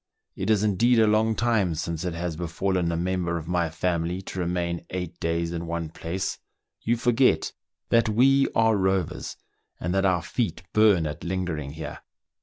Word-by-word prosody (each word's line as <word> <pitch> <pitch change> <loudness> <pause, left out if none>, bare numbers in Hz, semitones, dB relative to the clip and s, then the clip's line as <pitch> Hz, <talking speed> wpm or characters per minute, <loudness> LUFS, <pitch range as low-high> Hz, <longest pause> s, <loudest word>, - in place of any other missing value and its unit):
It - - -3
is 105 -2 +3
indeed 115 +4 +3
a 110 - +6
long 110 +1 +3
time 105 -8 +1
since 85 +1 -3
it 90 -2 -2
has 85 -1 -3
befallen 85 +1 -1
a 85 - -1
member 90 -1 -1
of 80 -1 -7
my 85 -1 +1
family 85 +1 -1
to 95 - -6
remain 85 -1 -1
eight 90 -2 -5
days 85 0 -1
in 85 0 -4
one 85 -1 -3
place: 90 +4 -4 0.4
you 120 +1 +1
forget 120 -8 +2 0.4
that 115 -1 +4
we 135 +5 +4
are 115 -1 +4
rovers, 95 -3 -1 0.4
and 90 +2 -2
that 95 0 +2
our 90 -3 +2
feet 95 -9 -2
burn 105 -6 +5
at 75 0 -5
lingering 85 -6 -3
here." 80 - -7
90 Hz, 175 wpm, -26 LUFS, 85-105 Hz, 0.4 s, a